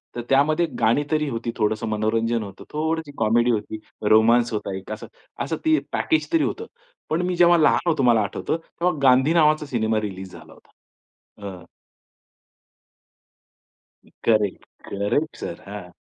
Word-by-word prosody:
तर 120 - -3
त्यामध्ये 155 +5 +3 0.2
गाणी 115 +6 +3
तरी 155 -1 +1
होती, 115 -1 -3
थोडंसं 110 +1 0
मनोरंजन 115 +2 0
होतं, 100 -1 -10
थोडीशी 160 -1 -2
कॉमेडी 120 +2 +3
होती, 110 +1 -7 0.3
रोमान्स 115 +2 +4
होता 100 -2 -3
एक 95 +3 -10
अस 110 - -6 0.4
असं - - -2
ते 315 0 +4
पॅकेजतरी 325 0 +1
होतं. 450 - -3 0.4
पण 160 +3 0
मी 180 - -1
जेव्हा 175 0 +5
लहान 160 +2 +3
होतो 155 -4 +1
मला 120 -3 +4
आठवतं - - -3
तेव्हा 170 +2 -2
गांधी 130 +4 +5
नावाचा 155 -2 +3
सिनेमा 110 -5 0
रिलीज 95 -1 -9
झाला - - -13
होता. - - -23 0.8
A 90 -3 -9 2.6
correct. 105 -4 +1 0.2
Correct 105 +11 -1
sir. - - -7
हां, 100 -3 -8
120 Hz, 140 wpm, -23 LUFS, 110-155 Hz, 2.6 s, जेव्हा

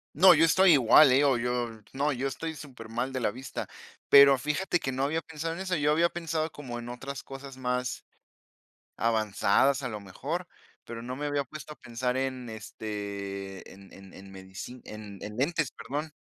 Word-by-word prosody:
No, 185 +4 +8
yo 160 - +5
estoy 185 +3 +6
igual 135 0 +7
,eh, 140 +3 +5
o 135 -3 +4
yo, 125 0 -1 0.2
no 145 +2 0
yo 130 +2 -2
estoy 160 +4 -5
supermal 125 -3 -5
de 130 - -2
la - - +1
vista, 130 +2 -6 0.4
pero 140 -1 +8
fíjate 150 +6 0
que 135 - -2
no 130 +1 -1
había 160 +3 0
pensado 160 +1 -5
en 170 - -7
eso. 185 -2 -1
Yo 150 0 +2
había 170 +2 +4
pensado 165 -2 -2
como 130 -6 -7
en 120 - -7
otras 135 +3 -6
cosas 135 0 -9
más, 125 0 -2 0.9
avanzadas, 115 +4 +2
a 125 - -3
lo 105 -2 -5
mejor, 145 - -5 0.4
pero 115 -1 -7
no 125 +2 -5
me 150 - -4
había 145 -1 0
puesto 155 +2 -9
a - - -20
pensar 125 +2 -3
en, 130 -2 -2
este, 100 -3 -6
en 95 0 -15
en 95 -1 -14
en 95 0 -12
medicin 95 +6 -9
en 105 -2 -9
en 105 0 -6
lentes, 150 +2 0
perdón. 150 +3 -5
130 Hz, 190 wpm, -28 LUFS, 115-150 Hz, 0.9 s, No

